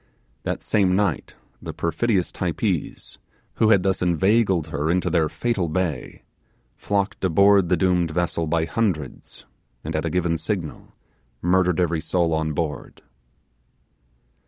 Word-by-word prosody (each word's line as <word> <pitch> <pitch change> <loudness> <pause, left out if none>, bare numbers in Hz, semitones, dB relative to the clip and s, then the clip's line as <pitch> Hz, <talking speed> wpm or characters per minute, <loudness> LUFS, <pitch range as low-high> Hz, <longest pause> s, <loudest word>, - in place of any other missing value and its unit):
That - - -4
same 95 -3 +2
night 105 +1 -1 0.3
the - - -6
perfidious 90 +3 0
Typees, 90 -1 -3 0.4
who 110 - +3
had 100 -4 +4
thus 95 -1 0
inveigled 90 -1 +2
her 75 +1 -2
into 90 +2 +1
their 80 -3 +2
fatal 110 -8 -1
bay, 80 -5 -3 0.5
flocked 100 0 -2
aboard 100 +1 +4
the 90 - +3
doomed 90 -3 +2
vessel 85 0 -1
by 80 0 +1
hundreds, 85 - -3 0.4
and 80 +1 -4
at 80 - 0
a - - 0
given 85 -1 0
signal 85 -2 -4 0.5
murdered 90 0 +2
every 85 -2 +1
soul 85 -1 0
on 80 -1 -1
board. 75 -1 -4
90 Hz, 135 wpm, -23 LUFS, 80-95 Hz, 0.5 s, had